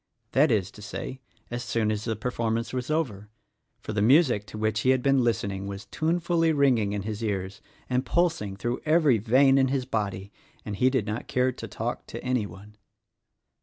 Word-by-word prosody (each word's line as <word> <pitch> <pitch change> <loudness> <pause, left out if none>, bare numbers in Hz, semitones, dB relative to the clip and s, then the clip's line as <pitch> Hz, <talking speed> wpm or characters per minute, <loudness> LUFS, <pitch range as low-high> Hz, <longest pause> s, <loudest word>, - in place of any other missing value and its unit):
That 145 +3 +4
is 100 -4 +1
to 105 - -13
say, 130 +4 -6 0.3
as 120 0 -3
soon 110 -3 0
as 105 0 -3
the 115 -1 -1
performance 115 +1 -2
was 125 +1 -3
over, 115 -11 -2 0.5
for 110 - -5
the 100 - 0
music 120 -3 +4
to 110 - -8
which 110 0 0
he 130 - +1
had 130 -1 +3
been 135 -2 +3
listening 100 -4 -1
was 100 +1 -6
tunefully 165 - +1
ringing 130 -9 +3
in 100 -1 -3
his 110 +1 -4
ears 95 -3 -3 0.3
and 125 0 0
pulsing 165 - 0
through 120 +4 -2
every 155 -6 +4
vein 135 +5 +4
in 135 - +4
his 130 -1 -1
body, 100 -5 -3 0.3
and 105 -2 -4
he 125 +5 +4
did 130 -6 0
not 105 +2 -4
care 125 +1 +1
to - - -8
talk - - -4
to - - -7
anyone. 105 -4 -3
115 Hz, 190 wpm, -27 LUFS, 105-135 Hz, 0.5 s, That